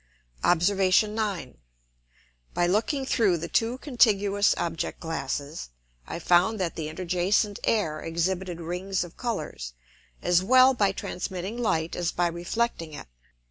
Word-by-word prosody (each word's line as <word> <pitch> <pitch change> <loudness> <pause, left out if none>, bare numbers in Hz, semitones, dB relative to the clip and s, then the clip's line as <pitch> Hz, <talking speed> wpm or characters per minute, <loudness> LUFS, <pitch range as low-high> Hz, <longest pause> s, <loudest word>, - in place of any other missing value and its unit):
Obs. 175 +3 +4 0.3
9. 210 - -3 1.0
By 175 - +2
looking 230 - 0
through 210 -9 +2
the 170 +1 -5
two 230 +7 0
contiguous 205 -7 +3
Object 165 -2 -3
glasses, 145 - -4 0.4
I - - -4
found 180 +5 +3
that 175 -3 -2
the 155 -2 -4
interjacent 185 +5 0
Air 160 -9 0
exhibited 175 +2 -2
Rings 180 +3 -2
of 175 -1 -11
Colours, 200 - -4 0.5
as 175 0 +3
well 255 +6 +6
by 205 -5 +2
transmitting 185 +2 -5
Light 170 -9 -1
as 175 -1 -1
by 175 - 0
reflecting 170 0 -2
it. - - -8
180 Hz, 130 wpm, -26 LUFS, 170-210 Hz, 1.0 s, well